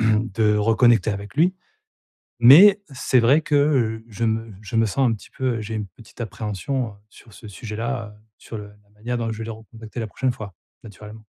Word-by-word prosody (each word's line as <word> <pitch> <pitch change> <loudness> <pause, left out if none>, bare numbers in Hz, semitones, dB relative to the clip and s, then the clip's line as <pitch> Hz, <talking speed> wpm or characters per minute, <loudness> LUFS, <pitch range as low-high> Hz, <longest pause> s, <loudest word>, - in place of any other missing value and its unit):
de 110 -1 +2
reconnecter 110 0 +3
avec 100 0 -6
lui. 180 +4 +3 0.9
Mais 190 - +8
c'est 130 -1 +1
vrai 130 +7 +4
que, 155 -1 -3
heu, 120 -7 +1
je 115 +1 -4
me 115 0 -1
je 105 +3 -5
me 115 0 +3
sens 130 +5 +1
un 115 - +1
petit 105 - -13
peu, 130 -3 -2
heu - - -5
j'ai 110 +1 -6
une 105 -2 -3
petite 110 +7 -18
appréhension, 115 +3 -3
heu, - - -13 0.2
sur 110 +1 -18
ce 110 - -13
sujet-là, 115 +3 -5
heu, - - -24 0.2
sur 115 - -9
le 105 0 -9
la 105 0 -23
manière 110 +4 -5
dont 115 -1 -2
je 110 - -5
vais 115 - -5
le 115 - -5
recontacter 110 +1 -10
la 115 - -3
prochaine 130 +5 -1
fois, 105 -6 -9 0.3
naturellement. 105 +1 -12
115 Hz, 210 wpm, -22 LUFS, 105-120 Hz, 0.9 s, Mais